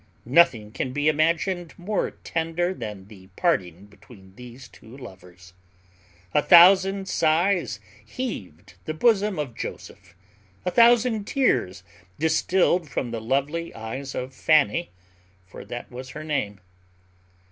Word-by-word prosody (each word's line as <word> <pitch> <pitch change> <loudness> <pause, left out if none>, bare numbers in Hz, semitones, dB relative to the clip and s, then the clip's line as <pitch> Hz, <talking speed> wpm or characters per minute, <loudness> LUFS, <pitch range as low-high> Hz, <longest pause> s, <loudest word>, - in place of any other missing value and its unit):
Nothing 120 -6 +3
can 125 +3 -4
be 145 +2 0
imagined 165 +3 0
more 200 +3 -2
tender 165 +2 -3
than 105 - -7
was 95 - -18
the 95 -3 -15
parting 95 - -1
between 100 -2 -18
these 125 +2 -12
two 115 +4 -15
lovers. 90 -7 -14 0.8
A 150 - +4
thousand 190 +3 +6
sighs 165 - +1 0.2
heaved 95 - -7
the 155 - -4
bosom 210 0 +2
of 145 -5 -4
Joseph, - - -9 0.5
a 180 - 0
thousand 235 -2 +4
tears 95 - 0 0.3
distilled 165 +1 +1
from 120 -2 -3
the 115 -1 -4
lovely 140 +8 -2
eyes 130 +5 -6
of 130 +1 -5
Fanny 155 +4 +2 0.6
(for 90 - -11
that 120 +1 -8
was 130 +1 -9
her 155 +3 -8
name). 120 -11 -3
145 Hz, 125 wpm, -24 LUFS, 110-175 Hz, 0.8 s, thousand